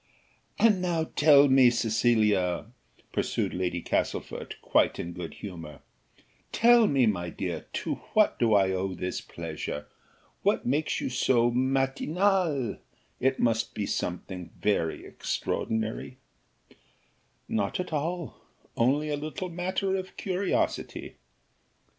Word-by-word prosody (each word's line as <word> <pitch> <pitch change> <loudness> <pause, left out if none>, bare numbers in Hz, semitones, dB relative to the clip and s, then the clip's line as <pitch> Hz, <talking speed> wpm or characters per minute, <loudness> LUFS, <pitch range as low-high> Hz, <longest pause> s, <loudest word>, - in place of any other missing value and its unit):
"And 210 -5 +4
now 170 -3 -1
tell 145 -1 +7
me, 130 -2 +6
Cecilia," 110 -6 +2 0.5
pursued - - -1
Lady 90 -1 -2
Castlefort, - - -2
quite - - +2
in 85 - -5
good 85 -2 -7
humour, 80 -7 -9 0.7
"tell 235 -1 +6
me, 135 -3 +3
my 90 -5 0
dear, - - -5
to - - -2 0.2
what 215 -1 +4
do 115 -3 +4
I 95 -1 +4
owe 95 0 -2
this 90 +1 -3
pleasure? 80 -3 -6 0.6
what - - +1
makes 145 +5 0
you - - -2
so 120 -1 +3
matinale? 135 - +1 0.4
It 130 +1 +1
must 115 -1 +1
be 105 - -1
something 90 -1 -4
very 85 -6 0
extraordinary." 110 +3 -3 1.3
"Not 100 - -1
at 180 -2 -4
all, 165 +2 -3 0.3
only 140 +6 +2
a 150 - 0
little 155 +6 -5
matter 185 +3 -1
of 190 0 -5
curiosity." 190 0 -2
125 Hz, 115 wpm, -28 LUFS, 100-160 Hz, 1.3 s, tell